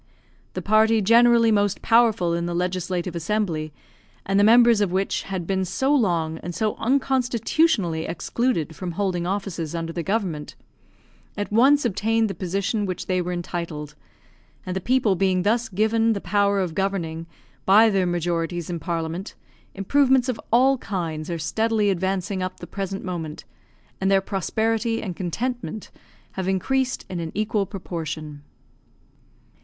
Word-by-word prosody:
The - - -5
party 220 +2 +4
generally 230 +2 +5
most 205 -2 +1
powerful 225 -7 +3
in 170 0 -1
the 175 - -3
Legislative 180 0 -2
Assembly, 165 -3 -1 0.5
and 195 +1 +2
the - - +5
members 235 0 +6
of 200 -4 +1
which 190 +2 0
had 190 -3 -5
been 190 +1 0
so 265 +10 0
long 170 - +1
and 175 0 -6
so 215 +4 0
unconstitutionally 250 - +1
excluded 170 - -1
from 180 0 -5
holding 180 -2 -1
offices 180 -5 -3
under 165 0 -4
the 170 - -3
government, 180 -6 -2 0.8
at 205 0 -3
once 270 +6 +4
obtained 225 0 +1
the - - -4
position 200 +3 -2
which 185 - -4
they 185 -1 0
were 180 0 -3
entitled, 170 -4 -5 0.7
and 185 - -4
the 190 - -2
people 240 -2 +2
being 185 -1 +1
thus 230 +4 +1
given 225 +3 +2
the 200 - -3
power 200 0 +1
of 180 -4 -1
governing 165 -4 -2 0.4
by 210 +4 +7
their 190 -2 +1
majorities 175 0 -2
in 170 - -3
Parliament, 170 +2 -4 0.4
improvements 260 +5 +3
of 250 -4 -3
all 260 +3 +4
kinds 165 -7 -4
are 170 - -2
steadily 210 +6 +1
advancing 190 +1 -2
up 185 0 -4
the - - -7
present 195 +1 -5
moment, 165 -4 -5 0.6
and 190 - +2
their 195 0 +5
prosperity 225 +4 -1
and 185 -5 -5
contentment 225 +5 -4 0.4
have 190 -1 -4
increased 260 +7 0
in 180 - -5
an 165 -1 -4
equal 210 -1 0
proportion. 155 -6 -6
195 Hz, 150 wpm, -23 LUFS, 175-225 Hz, 0.8 s, by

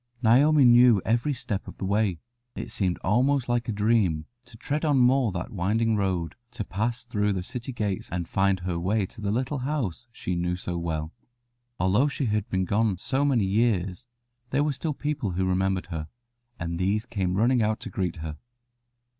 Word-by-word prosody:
Naomi 140 +5 +5
knew 120 -2 +7
every 120 +7 +1
step 125 -7 -4
of - - -9
the - - -4
way. 100 -2 +1 0.4
It - - -6
seemed 90 -3 0
almost 125 +6 +2
like 120 0 0
a - - +1
dream 105 -7 +1 0.2
to 115 - -15
tread 150 +7 -2
on 150 -3 +3
more 125 -2 +4
that 90 0 -5
winding 110 +4 +1
road, 95 -5 -1 0.2
to 115 - -3
pass 115 +6 -2
through 105 -3 0
the 90 -2 -3
city 125 +6 -5
gates 105 -6 -3
and 85 -1 -3
find 95 -1 +1
her 90 -1 -2
way 100 +4 +1
to 110 - -12
the 100 - -1
little 130 +6 -1
house 125 - -3
she 90 - -4
knew 90 +1 -1
so 90 -1 -5
well. 80 -2 -3 0.7
Although 100 +10 +3
she 140 -1 -2
had 105 -2 -1
been 95 0 0
gone 105 0 +1
so 135 +9 -1
many 130 -8 +2
years 100 0 0 0.4
there 140 +3 +2
were 150 -1 0
still 150 +2 -3
people 140 -11 -2
who 95 +2 0
remembered 95 0 0
her, 80 -1 -4 0.5
and 85 0 -3
these 100 +4 +1
came 95 -5 -1
running 120 +3 +3
out 110 0 +1
to - - -7
greet 90 -4 -2
her. 75 -1 -6
105 Hz, 190 wpm, -26 LUFS, 95-120 Hz, 0.7 s, knew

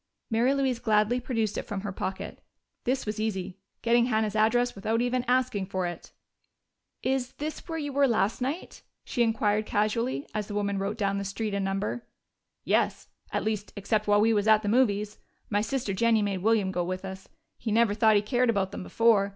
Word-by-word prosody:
Mary 235 +4 +3
Louise 265 -3 0
gladly 220 0 +2
produced 225 -4 -1
it - - -6
from 200 -2 -3
her 200 0 -4
pocket: 190 0 -5 0.4
this 260 +1 0
was 210 0 -3
easy 190 -3 -3 0.2
getting 235 0 +4
Hannah's 220 -3 0
address 240 +3 +3
without 220 +3 -1
even 245 +1 0
asking 250 -6 +1
for 185 -2 -2
it. 175 0 -6 0.9
"Is 260 -1 0
this 305 +1 -6
where 325 - -2
you 290 -3 -4
were 280 0 +4
last 220 -1 +1
night?" 280 +8 -4 0.2
she 245 - -2
inquired 215 -2 +2
casually, 230 +6 0
as 210 -1 -2
the 205 - -6
woman 200 -1 0
wrote 200 +3 -2
down 200 -2 0
the - - -3
street 200 +2 -3
and 200 0 0
number. 195 +4 -2 0.6
"Yes. - - 0 0.2
At - - -1
least, 215 -1 -2
except 210 +1 -1
while 205 0 +5
we 225 +1 +4
was 205 0 +1
at 215 0 +5
the - - -2
movies. 210 -3 +1 0.3
My 205 0 +2
sister 230 -2 -2
Jennie 225 +1 +3
made 200 -2 -1
William 210 -1 +2
go 180 -1 -1
with 185 +2 -4
us 190 0 -8 0.3
he 225 - -3
never 225 -1 +3
thought 220 0 +4
he 205 - +3
cared 245 +2 +1
about 195 -4 +1
them - - -6
before. 210 0 +3
215 Hz, 200 wpm, -28 LUFS, 200-240 Hz, 0.9 s, while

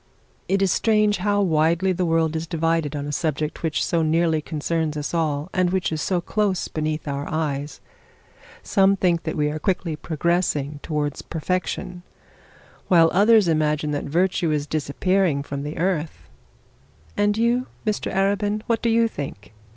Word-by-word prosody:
It 195 0 +2
is 190 - +2
strange 210 0 +2
how 205 +2 +1
widely 170 +2 +2
the 180 -1 0
world 165 -1 +1
is 160 +1 -3
divided 165 -2 0
on 145 -1 -3
a 145 - -4
subject 150 0 -2
which 160 -2 0
so 170 -2 +1
nearly 160 0 +2
concerns 155 0 -2
us 150 +2 -4
all, 155 0 -1
and 185 -1 +2
which 185 -1 0
is 155 -1 -2
so 180 +4 0
close 195 +1 -1
beneath 155 0 -3
our 140 0 -3
eyes. 145 -2 -3 0.8
Some 195 -1 +3
think 175 -3 +1
that 160 - -3
we 150 0 +1
are 155 - -4
quickly 170 -1 -1
progressing 155 -2 -1
towards 150 -2 -2
perfection, 180 +2 -3 0.9
while 165 -3 +5
others 210 +1 +5
imagine 150 -1 +1
that 145 - -2
virtue 175 +3 +1
is 150 -1 0
disappearing 155 +1 0
from 140 -1 -5
the 150 +2 -5
earth.' 165 -3 -2 0.9
'And 205 0 +1
you, 240 +3 +1 0.2
Mr 215 -1 -1
Arabin, 205 +2 0
what 230 -1 0
do 235 - +1
you 230 0 +3
think?' 135 - -7
165 Hz, 160 wpm, -23 LUFS, 150-190 Hz, 0.9 s, while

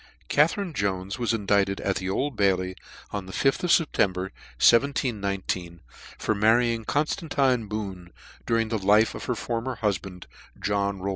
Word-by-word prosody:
(CATHERINE 165 +4 +2
JONES 100 -2 -2
was 120 -2 0
indicted 100 -3 +1
at 95 - 0
the 95 - -4
^^ - - -1
Old 135 +6 -1
Bailey, 95 -2 +1 0.4
on 100 -2 -4
the - - -8
fth 135 - +1
of 175 - +1
September, 95 - +2 0.3
1719, 100 -9 +1 0.4
for - - 0
marrying 115 +2 +2
Conftantine 140 -6 0
Boone, 95 -5 -5 0.4
during 115 -1 +1
the 110 -1 -1
life 105 +3 +4
of - - -7
her 125 - -1
former 120 +3 -3
hufband, 95 -3 -2 0.4
John 100 -1 0
Rowland. 95 +1 -3
105 Hz, 150 wpm, -26 LUFS, 95-120 Hz, 0.4 s, life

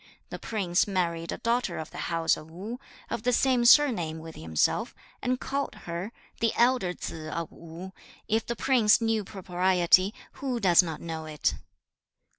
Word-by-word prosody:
The - - -5
prince 190 -5 0
married 170 -4 -1
a - - -4
daughter 230 -6 0
of 160 - -6
the - - -8
house 165 -1 +2
of 155 - -11
Wu, 205 +9 -7 0.3
of - - -2
the 250 - +1
same 250 0 +2
surname 230 - +5
with 160 0 -9
himself, 80 -1 0 0.3
and 255 0 0
called 275 +1 -3
her, 175 +5 -4 0.3
"The 230 -1 +2
elder 240 -6 +3
Tsze 155 -3 -7
of 165 -1 -4
Wu." 170 +3 -10 0.3
If 225 +1 +1
the 235 - -2
prince 230 -3 +4
knew 225 -2 0
propriety, 185 0 +2 0.3
who 260 -3 -1
does 180 -5 +6
not 160 -4 -6
know 160 -1 -5
it?' 150 -1 0
185 Hz, 165 wpm, -28 LUFS, 165-235 Hz, 0.3 s, does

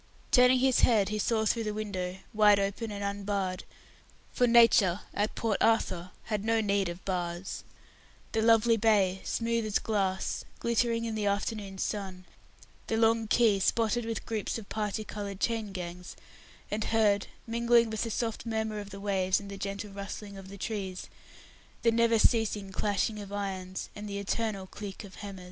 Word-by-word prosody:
Turning 250 +1 +6
his 260 0 +3
head, 210 -5 +4
he 215 0 -2
saw 220 +1 +1
through 230 +2 +1
the 210 -1 -3
window 190 -4 -3 0.2
wide 210 -1 +6
open 200 +3 -2
and 205 0 -5
unbarred, 200 -2 -2 0.7
for 245 - +3
Nature, 230 -6 +5
at 205 +1 -1
Port 220 -3 0
Arthur, 185 -6 +2
had 210 -2 -2
no 225 +1 +2
need 200 -3 +1
of 175 +2 -8
bars 175 -1 -3 0.7
the 220 - +1
lovely 225 0 +5
bay, 200 -4 +3
smooth 230 0 0
as 215 -1 +1
glass, 195 -3 -1
glittering 235 0 +1
in 225 - -2
the 210 -1 -1
afternoon 200 -1 -2
sun, 190 -2 -4 0.6
the 225 - 0
long 225 0 +3
quay, 215 -3 +4
spotted 230 +3 +1
with 225 0 -4
groups 220 -1 -2
of 220 -3 -9
parti 215 0 -2
coloured 200 -2 -6
chain 225 -3 -1
gangs, 180 -1 -7 0.6
and 210 0 -1
heard, 210 -3 +2 0.2
mingling 235 0 +3
with 220 - -2
the 230 - -1
soft 225 0 -2
murmur 220 -2 -2
of 205 -1 -7
the 200 0 -9
waves, 190 -2 +1
and 200 -1 -9
the - - -5
gentle 200 +1 -5
rustling 200 +1 -7
of 195 -1 -10
the 200 - -9
trees, 195 -3 -4 0.7
the 230 - +5
never 230 0 +3
ceasing 210 -3 +2
clashing 210 +2 0
of 200 -1 -8
irons, 190 -2 -4
and 210 0 -7
the 200 - -4
eternal 200 -1 -2
click 195 +1 -8
of 195 -2 -12
hammer. 200 -2 -7
210 Hz, 170 wpm, -30 LUFS, 195-225 Hz, 0.7 s, Turning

